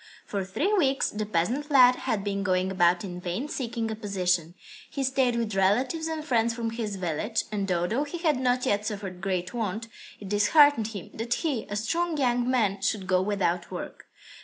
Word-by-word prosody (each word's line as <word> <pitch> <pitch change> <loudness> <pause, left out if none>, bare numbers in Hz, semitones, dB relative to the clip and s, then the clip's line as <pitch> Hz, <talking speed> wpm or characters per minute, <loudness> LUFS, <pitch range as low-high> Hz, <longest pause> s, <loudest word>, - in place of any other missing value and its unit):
For 200 -2 -3
three 295 - -1
weeks 275 -9 +2
the 210 0 -3
peasant 225 - -1
lad 255 -3 +7
had 210 -5 -2
been 200 -1 -2
going 185 -1 +1
about 175 -1 +3
in 180 -2 -6
vain 180 +11 -3
seeking 235 -5 -3
a - - -3
position. 180 -5 -1 0.3
He 275 - -3
stayed 260 -2 +2
with 230 -2 -1
relatives 245 - +1
and 315 -1 -4
friends 230 -4 +1
from 230 -1 -2
his 225 -3 -3
village, 190 +5 -2
and 200 -2 -2
although 180 +10 +1
he 295 +4 -6
had 315 -6 +1
not 250 -1 +1
yet 205 0 +1
suffered 200 -4 -5
great 185 -2 -2
want, 225 0 -3 0.3
it 200 - -8
disheartened 220 +4 +5
him 205 -5 -8
that 235 +2 -1
he, 275 -8 -1
a 205 - -3
strong 330 +10 -1
young 245 -2 +1
man, 210 -6 +1
should 200 -1 0
go 185 0 +2
without 185 -3 -1
work. - - -7
215 Hz, 190 wpm, -27 LUFS, 190-255 Hz, 0.3 s, lad